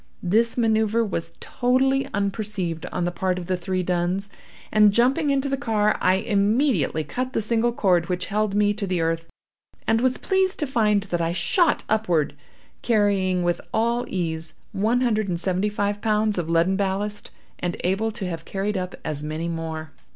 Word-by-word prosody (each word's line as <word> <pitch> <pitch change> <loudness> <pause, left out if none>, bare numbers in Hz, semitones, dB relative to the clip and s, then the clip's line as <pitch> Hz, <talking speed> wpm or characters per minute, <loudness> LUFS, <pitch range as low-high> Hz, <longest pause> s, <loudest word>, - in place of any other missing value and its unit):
This 225 +7 +2
manoeuvre 220 -1 +2
was 165 -5 -4
totally 265 +2 +1
unperceived 200 -4 -2
on 180 - -2
the 175 - 0
part 180 +1 -1
of 180 - -5
the 185 +1 0
three 185 +1 -2
duns; 180 +3 -1 0.4
and, 210 -1 +6
jumping 260 +8 +2
into 275 0 +1
the 275 - 0
car, 215 -5 +1
I 185 +1 +4
immediately 200 - +1
cut 255 - -4
the - - +1
single 230 +2 +1
cord 180 -7 +2
which 180 0 -1
held 210 0 -1
me 205 0 +3
to 205 -1 -4
the 180 -2 0
earth, 165 0 -1 0.6
and 225 +1 +2
was 255 0 +2
pleased 380 0 +1
to 300 - -1
find 215 -6 +2
that 175 -4 -2
I 165 0 0
shot 340 - +2
upward, 175 -10 +1 0.5
carrying 200 -5 +2
with 175 0 0
all 235 +2 +1
ease 165 -3 -3 0.2
one 225 +5 +1
hundred 215 -4 +1
and 175 -2 -2
seventy 185 +3 0
five 205 0 -2
pounds 215 -2 +1
of 165 -2 -3
leaden 170 +3 +3
ballast, 200 +1 -2 0.3
and 175 -1 -2
able 195 +5 +1
to 215 -4 -5
have 165 -2 -5
carried 195 +3 -2
up 185 -1 -4
as 150 -2 -3
many 155 +2 -3
more. 160 -1 -4
200 Hz, 180 wpm, -24 LUFS, 175-225 Hz, 0.6 s, and